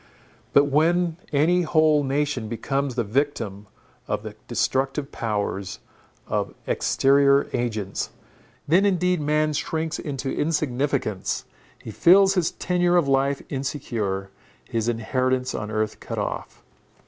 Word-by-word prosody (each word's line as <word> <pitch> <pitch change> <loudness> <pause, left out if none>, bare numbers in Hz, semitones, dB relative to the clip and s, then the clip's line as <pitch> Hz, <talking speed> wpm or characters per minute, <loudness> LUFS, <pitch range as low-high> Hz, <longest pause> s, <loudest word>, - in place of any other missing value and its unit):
But 140 - +6
when 165 +4 +2
any 160 +5 +3
whole 155 -2 +3
nation 140 -3 -1
becomes 135 +3 -2
the 120 - +1
victim 110 -4 -2 0.4
of - - -2
the 110 -1 -7
destructive 135 +3 -1
powers 100 -3 -3 0.5
of - - -2
exterior 140 0 +3
agents, 110 -5 -2 0.6
then 175 +6 +4
indeed 180 -3 +2
man 150 +1 +1
shrinks 160 +1 -2
into 135 -2 -4
insignificance, 140 - -1 0.3
he 110 - -9
feels 190 - +6
his 180 -4 +1
tenure 175 0 +1
of 165 -5 +2
life 135 +1 +1
insecure, 115 -9 -3 0.4
his 115 0 -1
inheritance 130 +3 0
on 105 0 -4
earth 110 0 -2
cut - - -6
off. - - -4
140 Hz, 120 wpm, -24 LUFS, 115-155 Hz, 0.6 s, But